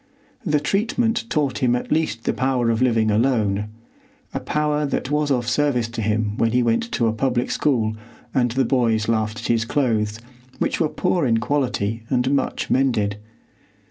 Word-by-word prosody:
The 150 -6 +1
treatment 225 +7 0
taught 145 -4 0
him 125 -3 +2
at 125 - -4
least 155 -8 0
the - - 0
power 130 -3 +1
of 115 +1 -1
living 115 -4 +2
alone,—a 110 -1 -2
power 150 0 0
that 140 -1 -2
was 150 0 +1
of 125 -4 0
service 125 -2 +1
to 115 -1 -4
him 105 0 0
when 115 0 +1
he 125 0 +3
went 120 - 0
to 120 - +1
a 110 - +1
public 125 +1 0
school 115 -7 +1 0.4
and 125 -2 +2
the 130 +3 +1
boys 115 -4 +1
laughed 110 0 -1
at - - -4
his 115 -1 +2
clothes, 110 -4 0 0.4
which - - -1
were 160 - +2
poor 175 -4 0
in 115 -1 +3
quality 115 -4 -1
and 130 0 +1
much 140 -2 -1
mended. 110 -6 +1
125 Hz, 175 wpm, -22 LUFS, 110-145 Hz, 0.4 s, he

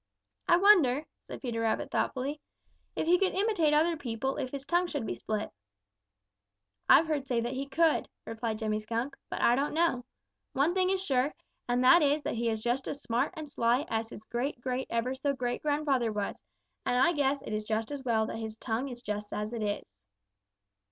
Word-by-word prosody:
"I 345 - +6
wonder," 325 -8 +5 0.2
said - - -8
Peter 235 -3 -2
Rabbit 225 -1 0
thoughtfully, 280 +3 -1 0.5
"if - - -1
he 350 +2 +4
could 385 -2 +1
imitate 385 -6 +2
other 320 +3 +3
people 265 -1 -3
if 255 - -2
his 275 0 -6
tongue 350 +3 +2
should 290 -8 -3
be - - -2
split." 215 -1 -3 1.4
"I've 325 - +8
heard 295 -4 -2
say 245 -3 +1
that 240 +2 -2
he 270 +1 -3
could," 320 +2 +2 0.2
replied 225 -1 -3
Jimmy 215 -1 -1
Skunk, 230 +5 -3
"but - - -4
I 235 - +6
don't 285 +3 -1
know. 325 -7 +2 0.5
One 285 +6 +2
thing 370 0 +2
is 385 0 0
sure, 270 0 +1 0.3
and 245 +1 +2
that 340 +7 +7
is 295 0 +2
that - - -2
he 235 0 0
is 220 -1 -2
just 245 +3 0
as 285 - -5
smart 245 +9 0
and 310 -1 -5
sly 245 +1 +1
as 225 0 -1
his 210 - -9
great 245 +4 -3
great 255 +1 -2
ever 235 +2 0
so 280 +2 -1
great 245 -2 -2
grandfather 290 -6 +1
was, 205 -1 -4 0.4
and 245 - +1
I 265 +7 +4
guess 280 -2 +1
it 215 - -5
is 215 0 -1
just 220 +3 -1
as 285 -2 -5
well 225 -3 +2
that - - -5
his 220 -1 -5
tongue 235 +4 -2
is 240 -1 -9
just 210 -1 -4
as 210 +2 -3
it 230 - -3
is." 205 - -3
260 Hz, 205 wpm, -30 LUFS, 230-295 Hz, 1.4 s, I've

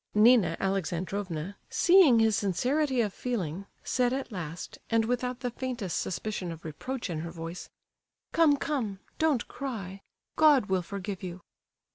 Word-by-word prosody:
Nina 225 +1 +5
Alexandrovna—seeing 195 - +2
his 225 -1 +4
sincerity 255 - +1
of 210 -4 -1
feeling—said 220 +3 -2
at 265 -1 -3
last, 165 -4 -6
and 225 -1 +3
without 250 +1 -1
the 245 - -2
faintest 240 -7 -3
suspicion 185 -1 -3
of 165 0 -10
reproach 235 - -4
in 165 -4 -3
her 170 +2 -4
voice: 165 +1 -7 0.6
"Come, 315 -4 +5
come—don't 270 +1 -1
cry! 200 -8 -6 0.4
God 295 -7 +6
will 190 -1 +3
forgive 195 +1 -5
you!" 180 -1 -6
210 Hz, 125 wpm, -29 LUFS, 180-255 Hz, 0.6 s, God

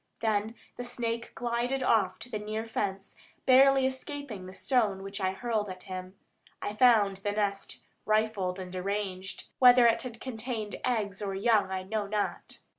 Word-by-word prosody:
Then 220 0 0 0.2
the 245 - -4
snake 235 -1 -3
glided 245 +2 -1
off 210 -7 +2
to 245 - -7
the 215 - -2
near 215 +2 -4
fence, 195 -3 -3 0.3
barely 270 +1 +6
escaping 260 -6 -4
the - - -8
stone 215 -8 +1
which 195 +1 -6
I 190 - +2
hurled 215 -1 -1
at 185 -1 -8
him. 185 0 -7 0.4
I 205 - -4
found 210 -4 +5
the 205 +1 -2
nest 200 -1 -2 0.2
rifled 215 -4 +1
and 185 -1 -7
deranged; 190 0 -4
whether 250 -1 +8
it 230 -1 +4
had 235 -3 -7
contained 225 -4 -4
eggs 210 -6 -1
or 195 -2 -2
young 205 -1 +3
I 190 0 -2
know 205 +1 -2
not. 205 0 -3
215 Hz, 165 wpm, -29 LUFS, 195-240 Hz, 0.4 s, whether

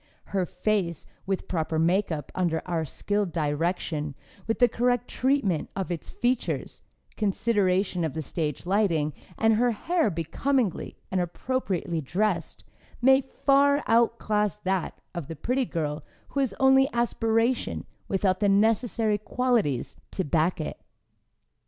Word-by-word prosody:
Her 190 -3 +1
face, 190 -7 -1 0.2
with 195 -1 -2
proper 160 -2 -1
makeup 165 -3 +1
under 170 -3 0
our 165 -3 -1
skilled 205 +5 -1
direction, 155 -1 -1 0.3
with 225 - 0
the 245 - +6
correct 245 +1 +1
treatment 250 - +1
of 190 -2 -3
its 170 - -5
features, 245 0 -1 0.4
consideration 195 -3 +1
of 155 -5 -2
the 160 - -2
stage 150 0 -3
lighting, 175 -6 +1 0.2
and 225 0 +4
her 240 +3 +3
hair 320 +6 +1
becomingly 195 - -1
and 185 -1 +1
appropriately 180 -3 -2
dressed, 195 +10 -1 0.4
may 265 +2 +6
far 280 +2 +3
outclass 220 -3 +2
that 190 -1 -2
of 170 -6 -5
the 165 - -6
pretty 250 - 0
girl 150 -5 -3 0.3
who 280 - -2
has 260 -8 0
only 265 0 +5
aspiration 230 0 +1 0.2
without 190 -1 +1
the 205 - +3
necessary 220 +1 +2
qualities 215 - 0
to 190 - -2
back 165 +3 +1
it. 155 - -5
195 Hz, 130 wpm, -27 LUFS, 170-235 Hz, 0.4 s, the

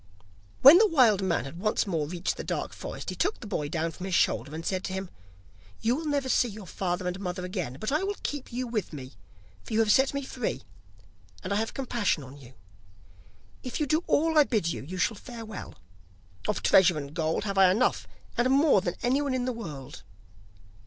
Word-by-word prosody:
When 290 +7 +11
the 435 - +6
wild 245 - +4
man 185 -6 0
had 155 +5 -8
once 215 +2 +1
more 165 -7 -1
reached 175 +2 -2
the - - -6
dark - - -3
forest, - - -6
he - - -6
took 405 +4 0
the - - -9
boy 150 -8 -3
down 165 +1 -1
from 185 +3 -7
his 185 - 0
shoulder, 140 0 +1
and 165 +1 -6
said 185 -1 -1
to 190 - -4
him: 190 -1 -5 0.7
'You 235 +3 +1
will 315 +2 -4
never 285 -2 0
see 250 - +3
your 210 -2 -9
father 180 0 -3
and 180 +1 -3
mother 180 -1 -4
again, 180 - -4
but 215 - -2
I 300 - +2
will 400 +1 -2
keep 290 -3 -4
you 250 +2 -2
with 220 -8 -3
me, 130 -3 -8 0.5
for - - -8
you 220 - +2
have 220 -2 +4
set 265 +4 +3
me 280 - -2
free, 255 -3 -4 0.8
and 195 - -2
I - - +1
have 225 +1 -2
compassion 235 - 0
on 130 +1 -11
you. 130 -3 -15 1.1
If 250 - -5
you 300 - +1
do 310 +5 +1
all 320 +1 +3
I - - +8
bid 215 -11 0
you, - - -6
you 180 +7 -7
shall 185 - +1
fare 235 0 -9
well. 215 -2 -8 0.7
Of - - -1
treasure 180 -3 +5
and 140 -1 -6
gold 160 +1 -1
have 195 -1 -1
I 190 -1 +7
enough, 220 +8 +1 0.3
and 240 +2 +3
more 275 -5 +5
than 175 -2 -3
anyone 265 +2 +1
in 250 -1 -1
the 255 - -1
world. 150 - -8
205 Hz, 220 wpm, -28 LUFS, 175-255 Hz, 1.1 s, When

